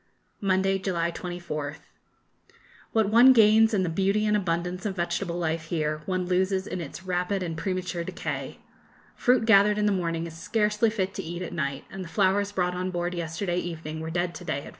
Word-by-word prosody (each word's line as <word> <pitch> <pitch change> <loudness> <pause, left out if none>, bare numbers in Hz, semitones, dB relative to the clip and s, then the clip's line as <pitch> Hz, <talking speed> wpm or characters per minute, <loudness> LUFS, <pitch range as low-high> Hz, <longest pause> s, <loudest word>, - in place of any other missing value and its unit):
Monday, 195 0 +2
July 170 -3 -1
24th. 170 -5 -5 1.1
What 220 -2 +2
one 245 +4 +8
gains 220 -1 +6
in 200 -4 +1
the 180 - -1
beauty 195 +5 +1
and 210 0 +2
abundance 180 -1 -1
of 205 -3 -2
vegetable 175 0 -2
life 165 -1 -1
here, 155 -2 -2
one 185 -1 -1
loses 190 +1 +1
in 180 - -4
its 165 +3 -8
rapid 185 +1 -1
and 165 -2 -3
premature 180 0 -2
decay. - - -5 0.6
Fruit 250 -2 +3
gathered 210 -1 +5
in 210 - +1
the 210 - +3
morning 170 -3 -1
is 165 -1 -8
scarcely 210 +5 +1
fit 195 -3 -2
to 195 - -5
eat 175 +2 -5
at 175 - -6
night, 140 -4 -3
and 195 -1 -6
the 170 - -9
flowers 200 +3 +2
brought 180 -3 0
on 180 +1 -2
board 175 0 -2
yesterday 175 +2 -2
evening 160 -3 -5
were 160 0 -5
dead 175 +1 -1
to - - -9
day 140 -5 -2
at - - -13
4. - - -9
180 Hz, 200 wpm, -26 LUFS, 170-200 Hz, 1.1 s, one